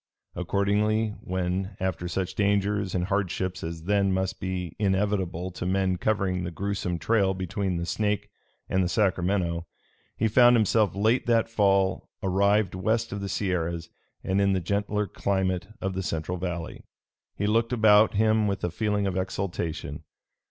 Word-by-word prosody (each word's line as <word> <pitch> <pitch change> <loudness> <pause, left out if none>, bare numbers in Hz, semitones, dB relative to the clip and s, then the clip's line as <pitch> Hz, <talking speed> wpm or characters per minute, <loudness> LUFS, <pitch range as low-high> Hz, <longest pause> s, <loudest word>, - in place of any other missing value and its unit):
Accordingly 105 +4 +1
when, 95 +2 -2
after 90 -2 -2
such 90 +1 -2
dangers 100 -1 +1
and 90 -1 0
hardships 95 -2 -2
as 80 0 -5
then 100 +1 +2
must 95 0 -1
be 90 -3 -4
inevitable 95 -3 0
to 90 - -6
men 95 -1 +1
covering 95 -3 0
the 90 - -3
gruesome 95 0 -2
trail 95 +1 +2
between 95 0 -2
the 85 - -2
Snake 105 +2 -1 0.4
and 95 0 +1
the 90 - 0
Sacramento, 90 -4 0 0.5
he 110 - +2
found 120 +2 +6
himself 110 -4 +2
late 110 +6 +2
that 115 -1 +3
fall 100 -3 +2
arrived 100 +1 +2
west 110 +5 0
of 100 0 -4
the 100 - -4
Sierras 85 -4 -2 0.3
and 95 +1 +1
in 100 -1 +3
the 95 - +1
gentler 100 +3 -1
climate 95 -1 -1
of 95 0 -2
the 95 - -2
central 90 0 -3
valley, 85 -2 -4 0.5
he 100 - -2
looked 115 +2 +2
about 110 -3 +5
him 110 0 +3
with 100 -1 -2
a 85 - 0
feeling 105 +2 0
of 95 -2 -1
exultation. 95 -3 -3
95 Hz, 155 wpm, -26 LUFS, 90-105 Hz, 0.5 s, found